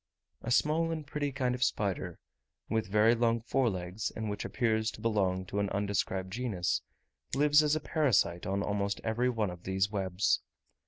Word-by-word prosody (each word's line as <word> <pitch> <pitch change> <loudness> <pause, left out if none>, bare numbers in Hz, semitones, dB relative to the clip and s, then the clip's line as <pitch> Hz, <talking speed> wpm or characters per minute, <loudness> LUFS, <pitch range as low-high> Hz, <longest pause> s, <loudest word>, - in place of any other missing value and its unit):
A - - -5
small 155 +6 +2
and 160 -2 -3
pretty 145 0 -2
kind 130 -2 0
of 125 0 -1
spider, 95 -6 -1 0.5
with 110 -1 -1
very 105 +3 +4
long 115 0 +2
fore 125 +2 +1
legs, 90 +1 -4
and 110 -2 -3
which 105 - -4
appears 110 -3 0
to - - -10
belong 95 -5 0
to 100 +3 -3
an 100 -1 0
undescribed 95 -2 -1
genus, 110 -7 -1 0.5
lives 145 +1 +5
as 150 0 +2
a - - 0
parasite 130 - +1
on 100 +1 0
almost 100 0 -1
every 120 +3 +1
one 110 -6 -1
of 90 -1 -10
these 95 +2 0
webs. 95 -1 +1
110 Hz, 175 wpm, -31 LUFS, 95-125 Hz, 0.5 s, lives